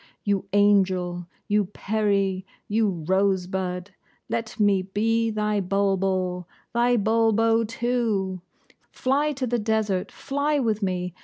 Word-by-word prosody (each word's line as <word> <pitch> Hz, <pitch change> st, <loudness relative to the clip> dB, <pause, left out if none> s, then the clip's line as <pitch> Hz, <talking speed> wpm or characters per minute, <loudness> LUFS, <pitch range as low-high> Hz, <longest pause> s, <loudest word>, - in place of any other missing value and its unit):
You 200 Hz, -2 st, 0 dB
angel 185 Hz, -4 st, +2 dB, 0.2 s
you 205 Hz, 0 st, +2 dB
peri 200 Hz, -1 st, 0 dB, 0.2 s
you 215 Hz, 0 st, +2 dB, 0.2 s
rosebud, 190 Hz, -1 st, 0 dB, 0.4 s
let 230 Hz, 0 st, -3 dB
me 200 Hz, -2 st, +3 dB
be 225 Hz, +4 st, 0 dB
thy 210 Hz, -1 st, 0 dB
bulbul 190 Hz, -2 st, 0 dB, 0.3 s
thy 240 Hz, +1 st, +3 dB
Bulbo, 225 Hz, +1 st, +3 dB
too! 220 Hz, -5 st, -1 dB, 0.5 s
Fly 285 Hz, +4 st, 0 dB
to 265 Hz, -1 st, -3 dB
the 240 Hz, 0 st, 0 dB
desert, 210 Hz, -3 st, 0 dB
fly 285 Hz, +2 st, -1 dB
with 225 Hz, -5 st, 0 dB
me! 180 Hz, -2 st, -2 dB
205 Hz, 110 wpm, -25 LUFS, 190-225 Hz, 0.5 s, me